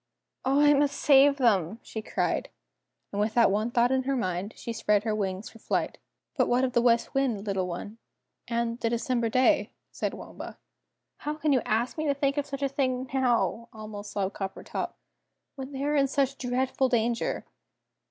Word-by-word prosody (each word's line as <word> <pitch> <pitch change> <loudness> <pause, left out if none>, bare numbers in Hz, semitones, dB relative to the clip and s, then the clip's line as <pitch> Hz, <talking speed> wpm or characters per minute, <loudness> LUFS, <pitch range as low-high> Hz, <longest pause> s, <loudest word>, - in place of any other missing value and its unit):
"Oh, 270 +2 +2
I 295 0 +6
must 285 0 +2
save 280 0 +6
them!" 215 - +2
she 220 - -6
cried, - - -1 0.6
and 205 - -1
with 215 +1 0
that 235 -4 +5
one 215 +3 0
thought 240 +1 +3
in 265 0 +2
her 275 0 +1
mind, 185 -3 -2
she 235 - -5
spread 210 -2 +2
her 220 -1 0
wings 195 -1 -2
for 225 - -15
flight. - - -2 0.4
"But - - +2
what 245 +2 +2
of 255 -2 0
the 240 - +4
West 235 -1 +2
Wind, 250 -7 0
little 195 -3 -1
one 205 +5 -6 0.5
and 235 0 -1
the 230 - 0
December 235 0 0
day?" 255 +3 +3 0.2
said - - -3
Waomba. - - -9
"Oh, - - -44 0.6
how 300 - -3
can 300 -1 +1
you 255 - +3
ask 235 +7 0
me 310 - -1
to 280 - +2
think 275 0 0
of 290 0 -1
such 280 0 -5
a - - +3
thing 260 -2 -1
now," 240 -3 +1
almost 215 -1 -8
sobbed 195 -1 -1
Coppertop, 195 -1 -4 0.6
"when 265 0 -7
they 275 0 -4
are 295 +1 +1
in 275 -1 +4
such 275 0 0
dreadful 255 +1 0
danger?" 235 -1 0
240 Hz, 190 wpm, -28 LUFS, 215-270 Hz, 0.6 s, I